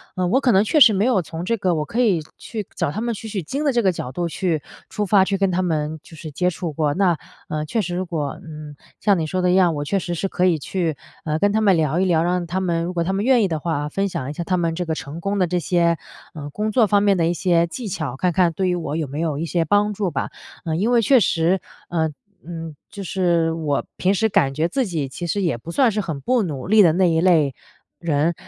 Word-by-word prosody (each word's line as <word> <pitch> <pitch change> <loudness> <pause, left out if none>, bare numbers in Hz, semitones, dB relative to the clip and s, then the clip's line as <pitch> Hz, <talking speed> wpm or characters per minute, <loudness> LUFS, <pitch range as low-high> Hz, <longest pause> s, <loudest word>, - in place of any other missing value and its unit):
呃， 185 -1 0
我 250 +9 +3
可 255 - +3
能 195 -1 +5
确 300 +8 +2
实 235 -6 +8
没 200 +2 +1
有 245 -7 +3
从 160 +2 -6
这 230 +6 0
个 185 -3 +1
我 150 -1 -1
可 230 - -3
以 205 -9 +3 0.2
去 215 -4 -6
找 - - -1
他 215 - -4
们 235 0 -1
取 220 - -8
取 205 -3 -3
经 270 - -3
的 280 - +2
这 240 - +3
个 190 -4 +3
角 130 -7 -6
度 170 +6 -2
去 165 -3 -1 0.3
出 210 - -2
发 190 0 +5
去 195 0 0
跟 195 -1 +2
他 185 0 0
们 155 -2 -1
就 165 - -14
是 160 0 -8
接 180 +5 +1
触 170 -1 -4
过。 150 -1 0
那， 180 -2 +2 0.3
呃， 155 0 -3
确 220 +9 -1
实 175 -2 -3
如 185 +1 -2
果， 155 -5 -3
嗯， 150 -2 -9 0.2
像 200 -2 +3
你 160 - -1
说 185 +4 -2
的 180 - +2
一 - - +3
样， 180 -3 +4
我 145 - -2
确 195 +7 0
实 175 -2 -3
是 175 +3 -1
可 180 -1 0
以 170 -4 +3
去， 165 +1 -2 0.3
呃， 155 0 -1
跟 205 +3 +3
他 220 +1 +1
们 200 -3 +4
聊 160 0 +1
一 190 - +2
聊， 170 -3 +3
让 175 0 0
他 175 +2 -2
们 170 -2 0
如 175 +2 -3
果 170 -1 0
他 180 - -1
们 195 +2 -1
愿 255 -2 +5
意 - - +2
的 160 -3 -2
话， 150 -2 -2
分 195 +6 -1
享 140 -8 -4
一 - - -4
下 170 - -4
他 185 +2 0
们 165 -2 0
这 180 +1 -2
个 165 - -1
成 160 0 -6
功 200 +3 -2
的 180 - +3
这 180 +1 -1
些， 170 -1 +2 0.4
呃， 145 -2 -6
工 210 +7 -2
作 225 +1 +4
方 205 -1 +3
面 200 -2 +3
的 165 - +2
一 170 - +1
些 170 0 +2
技 220 +8 -6
巧， 155 -9 -3
看 180 +5 +1
看 175 -1 +2
对 185 +3 0
于 180 - +1
我 160 -4 -3
有 160 -2 -2
没 140 +3 -6
有 160 -3 -1
一 160 - -2
些 170 0 0
帮 205 +5 +2
助 195 -3 -2
吧。 - - -2 0.4
呃， 160 -1 -1
因 205 +8 +1
为 240 -1 +4
确 260 +4 +5
实， 175 -2 +2 0.3
嗯 160 -3 0 0.3
嗯， 165 -2 -7
就 200 - -7
是 170 -3 +1
我 155 -4 -1
平 190 +2 +2
时 220 +3 +1
感 135 -8 +2
觉 155 +4 0
自 260 +9 0
己 160 -8 -2
其 175 +6 -6
实 200 +5 -1
也 165 -10 0
不 160 +8 -8
算 250 +5 +3
是 210 - -2
很 160 -7 -4
不 245 - +1
努 145 -7 -5
力 215 +2 +6
的 165 -4 +5
那 180 +1 +3
一 160 -1 +2
类 160 -6 +3 0.5
人， 160 0 +1
175 Hz, 300 characters per minute, -21 LUFS, 160-195 Hz, 0.5 s, 实